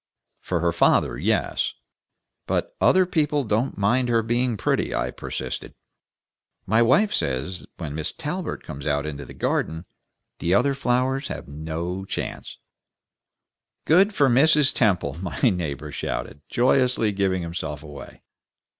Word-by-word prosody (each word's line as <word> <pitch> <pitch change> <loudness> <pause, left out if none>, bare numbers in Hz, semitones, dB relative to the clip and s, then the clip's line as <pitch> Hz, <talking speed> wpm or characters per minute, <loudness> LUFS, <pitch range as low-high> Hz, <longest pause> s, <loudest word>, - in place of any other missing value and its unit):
"For - - -2
her - - +2
father, - - +3
yes, - - 0 0.7
but - - -1
other 185 0 +5
people 150 -4 +1
don't 110 +3 -1
mind 120 +5 +2
her 115 -1 +3
being 120 0 0
pretty," - - 0
I - - -1
persisted. - - -5 0.9
"My 110 +3 +3
wife 165 - +4
says 70 +7 -2
when 80 -4 -5
Miss 80 +3 -3
Talbert 160 - -4
comes 70 -2 -7
out 70 -1 0
into 70 -2 -5
the - - -11
garden, 80 +2 -1 0.5
the 85 +3 +2
other 140 +7 +3
flowers 130 +1 0
have - - -6
no 80 +5 -4
chance." 95 - -5 1.3
"Good 190 +6 +5
for 145 -8 +3
Mrs. 145 +3 +5
Temple!" 90 - +1
my 85 -8 -5
neighbor 75 -5 0
shouted, 75 0 -4
joyously 125 -3 +2
giving 95 -2 0
himself 80 -3 -5
away. 70 -3 -11
100 Hz, 135 wpm, -24 LUFS, 80-130 Hz, 1.3 s, other